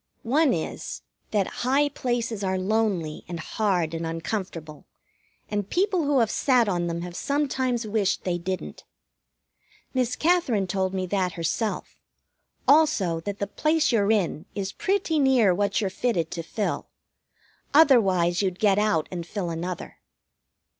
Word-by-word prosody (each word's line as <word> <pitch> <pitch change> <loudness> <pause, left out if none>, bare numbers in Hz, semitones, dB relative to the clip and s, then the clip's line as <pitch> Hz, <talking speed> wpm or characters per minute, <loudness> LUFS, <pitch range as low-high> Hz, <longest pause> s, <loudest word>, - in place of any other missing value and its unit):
One 280 +5 +3
is 160 -3 -4 0.3
that 205 -3 +1 0.2
high 275 +4 +3
places 240 -5 -2
are 190 -1 0
lonely 190 -5 -1
and 170 -1 -5
hard 180 -3 0
and 165 0 -3
uncomfortable, 165 -2 -5 0.6
and 205 -1 -3
people 370 -3 +1
who 285 -1 +2
have 225 - +1
sat 250 -5 +3
on 175 -3 0
them 170 0 -3
have 175 -1 -7
sometimes 260 -4 -1
wished 210 -2 0
they 175 -1 -1
didn't. 185 +2 -5 1.1
Miss 250 -1 0
Katherine 310 - +2
told 190 0 -1
me 185 -1 -1
that 185 -1 -1
herself, 170 +6 -3 0.7
also 280 - +4
that 200 +4 -5
the 200 - -1
place 305 +9 +1
you're 210 -3 +3
in 190 -7 0
is 195 -1 -3
pretty 375 -5 0
near 255 -8 +4
what 200 +2 0
you're 195 -4 -1
fitted 185 -10 -1
to 170 - -3
fill. 205 +5 -3 0.8
Otherwise 195 - +4
you'd 185 -2 -1
get 205 -1 +3
out 210 -7 +1
and 175 -2 -4
fill 180 -4 -3
another. 175 +2 -5
205 Hz, 145 wpm, -25 LUFS, 180-250 Hz, 1.1 s, also